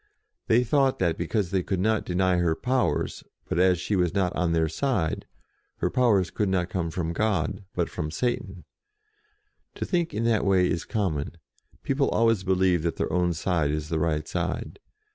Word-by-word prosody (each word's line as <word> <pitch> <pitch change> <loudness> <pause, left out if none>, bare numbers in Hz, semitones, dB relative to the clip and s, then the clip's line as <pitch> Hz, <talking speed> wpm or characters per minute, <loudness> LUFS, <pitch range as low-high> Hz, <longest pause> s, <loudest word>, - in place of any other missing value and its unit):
They 120 +2 +4
thought 135 +2 +2
that, 85 -3 +1
because 90 +2 -1
they 95 -2 +1
could 95 0 -2
not 110 +3 +1
32 90 - -2
JOAN - - +2
OF - - +4
ARC 95 0 +3
deny - - +1
her 80 -2 +2
powers; 125 - -1 0.2
but, - - -1
as 90 -1 +4
she 100 +3 -1
was 90 -1 +1
not 95 -3 +1
on 85 0 +1
their 80 -1 +2
side, 90 - -1 0.5
her 90 - -1
powers 105 -8 +3
could 105 -2 0
not 90 -2 0
come 85 -3 -1
from 85 -1 -3
God, 100 -1 -1
but - - 0
from 75 - -4
Satan. 95 -1 -3 1.1
To - - -3
think 175 -3 0
in 110 - -2
that 115 -2 +2
way 95 -2 +3
is 85 - -2
common: 85 -8 -2 0.5
people 135 0 +1
always 115 -4 +2
believe 95 -2 +2
that 85 0 -1
their - - -2
own 90 -1 +2
side 80 -2 0
is 75 +1 -3
the 80 -1 0
right 75 -1 0
side. 90 - -3
90 Hz, 200 wpm, -26 LUFS, 85-110 Hz, 1.1 s, They